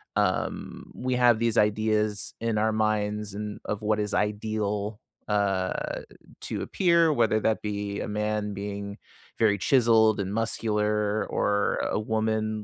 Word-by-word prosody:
Um, - - -1
we 130 0 -1
have 120 -2 +5
these 115 -1 +1
ideas 105 0 +1
in 115 -1 -1
our 110 +1 +2
minds 105 -1 -1
and 105 0 -5
of 105 0 -3
what 105 0 +1
is 105 0 -2
ideal, 105 0 -1 0.3
uh, 100 -3 -1 0.4
to - - -4
appear, 170 -3 +3
whether 115 -6 +2
that 110 0 +1
be 100 -1 -3
a - - -3
man 105 0 -2
being 100 0 -5 0.4
very 105 -3 +4
chiseled 110 -1 +4
and 100 0 -2
muscular 105 -1 0
or 100 0 +1
a - - -1
woman 110 0 -1
105 Hz, 140 wpm, -27 LUFS, 105-110 Hz, 0.4 s, have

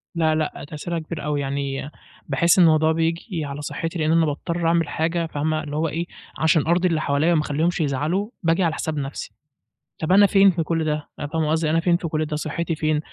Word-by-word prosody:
لأ 160 -1 +2
لأ 155 -1 -2
تأثيرها 165 +3 -4
كبير 160 0 -6
أوي، 150 -1 -1
يعني 140 +1 -3 0.4
باحس 170 +6 +3
الموضوع 160 -2 +5
بييجي 165 +1 -1
على 140 +1 -6
صحّتي 165 +3 -4
لإن 155 +1 +1
أنا 165 -1 +4
باضطر 165 +3 -2
اعمل 165 -2 +2
حاجة 165 +1 -1
فاهمة 155 0 -2
اللي 145 0 -6
هو 160 +2 +1
إيه، 165 +3 -3 0.3
عشان 160 -1 +2
أرضي 175 +2 +3
اللي 160 -3 0
حواليّا 150 +4 +2
وما 155 - +3
اخلّيهمش 160 +4 0
يزعلوا، 155 - -1
باجي 165 +3 +2
على 165 -2 +1
حساب 155 -2 -3
نفْسي، 140 0 -5 0.7
طب 160 +3 -1
أنا 200 +2 +7
فين 195 -1 +5
في 165 -2 -1
كلّ 165 0 -1
ده؟ 150 -1 -2
يعني 145 - -5
فاهمة 160 -2 0
قصدي، 160 -1 +1
أنا 165 +1 +2
فين 170 0 +2
في 170 - -4
كلّ 155 0 -1
ده، 150 0 -4
صحّتي 165 +2 -2
فين؟ 155 -1 0
160 Hz, 215 wpm, -23 LUFS, 150-170 Hz, 0.7 s, أنا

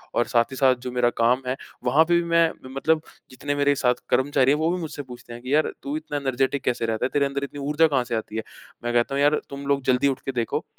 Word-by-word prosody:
और 120 - +3
साथ 120 +1 +2
ही 130 - -6
साथ 130 -1 +4
जो 125 - -3
मेरा 125 -1 +2
काम 125 +3 +3
है, 125 - 0 0.3
वहाँ 135 +6 +5
पे 175 - +2
भी - - -4
मैं 170 -1 +4 0.2
म 130 - -9 0.2
मतलब 160 - +6 0.3
जितने 145 +3 -4
मेरे 145 0 +3
साथ 125 -2 +2
कर्मचारी 135 +1 +3
हैं, 145 - +3
वो 160 +1 +1
भी 180 - -1
मुझसे 150 -2 -5
पूछते 125 -2 -11
हैं 120 - -9
कि, 130 +3 -3
"यार 155 +1 +3
तू 140 +2 -3
इतना 150 -1 -4
एनर्जेटिक 135 0 -1
कैसे 120 -3 0
रहता 115 +2 -1
है? - - 0
तेरे 145 -1 +3
अंदर 140 0 -3
इतनी 145 +1 -6
ऊर्जा 160 +2 +4
कहाँ 135 -4 +1
से 120 -1 -3
आती 110 -1 -5
है?" 110 - -2 0.4
मैं 120 0 -2
कहता 120 +3 +1
हूँ, 140 - +1
"यार 145 +1 +4
तुम 140 0 -7
लोग 140 -1 +2
जल्दी 125 +2 +2
उठकर 135 0 -2
देखो। 115 - -3
135 Hz, 275 wpm, -24 LUFS, 125-145 Hz, 0.4 s, मतलब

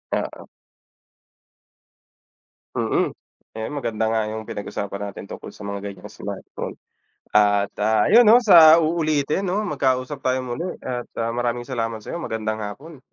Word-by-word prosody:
Oo. - - -5 2.3
Mm. - - +1 0.4
Ayan, 110 +3 -5
maganda 115 -5 -1
nga 110 0 +1
yung 110 0 -6
pinag-usapan 100 0 -5
natin 100 - -10
tungkol - - -8
sa 105 - -9
mga 100 0 -5
ganiyang 95 -2 -11
smartphone, - - -7 0.5
at, 100 -1 +3
ah, 110 0 +2
ayun 235 +3 +7
'no, 230 +4 +7
sa 170 -7 +8
uulitin 155 +1 0
'no, 195 +3 0
magkausap 135 -4 -1
tayo 130 0 +1
muli 125 +6 -4 0.2
at, 125 -1 -4 0.2
ah, 115 - 0
maraming 120 0 -1
salamat 115 -3 -2
sa'yo. 140 - -6
Magandang 110 -8 -3
hapon. 140 +10 -9
120 Hz, 135 wpm, -23 LUFS, 110-155 Hz, 2.3 s, sa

